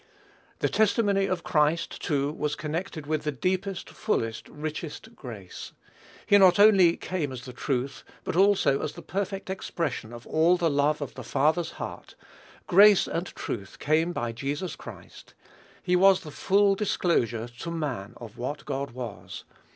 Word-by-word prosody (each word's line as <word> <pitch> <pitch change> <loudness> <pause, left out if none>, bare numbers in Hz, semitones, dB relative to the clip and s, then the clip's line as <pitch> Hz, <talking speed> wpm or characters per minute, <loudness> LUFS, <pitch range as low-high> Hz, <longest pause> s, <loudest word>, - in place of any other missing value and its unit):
The - - +3
testimony 205 -2 +2
of 185 -3 -2
Christ, 150 +2 +1
too, 145 -1 0
was 150 -1 -2
connected 160 0 -4
with 155 0 -1
the 150 - -2
deepest, 185 +6 -2
fullest, 115 - -2
richest 155 +8 -6
grace. 110 -8 -9 0.5
He 205 - +6
not 185 -2 +6
only 195 -5 +6
came 165 -7 -3
as 125 -1 -8
"the 125 - -8
truth," 135 0 -3 0.2
but - - -3
also 190 -7 +4
as 150 - -3
the - - -11
perfect 195 0 -3
expression 160 - -3
of 120 0 -10
all 165 +3 +3
the 170 -3 +1
love 145 +1 +1
of 140 - -8
the 130 - -8
Father's 155 +7 +1
heart; - - -8 0.5
"grace 200 +2 +6
and 170 +2 -3
truth 100 - -6
came 160 +3 +1
by 120 -9 -2
Jesus 145 +8 -4
Christ." - - -12 0.5
He 180 - +2
was 190 +1 +5
the 155 -4 -9
full 200 +5 +3
disclosure 145 - 0
to 170 - -5
man 140 -12 -4
of 115 -2 -11
what 140 +5 -4
God 140 -1 -3
was. 120 -4 -8
155 Hz, 160 wpm, -27 LUFS, 135-185 Hz, 0.5 s, He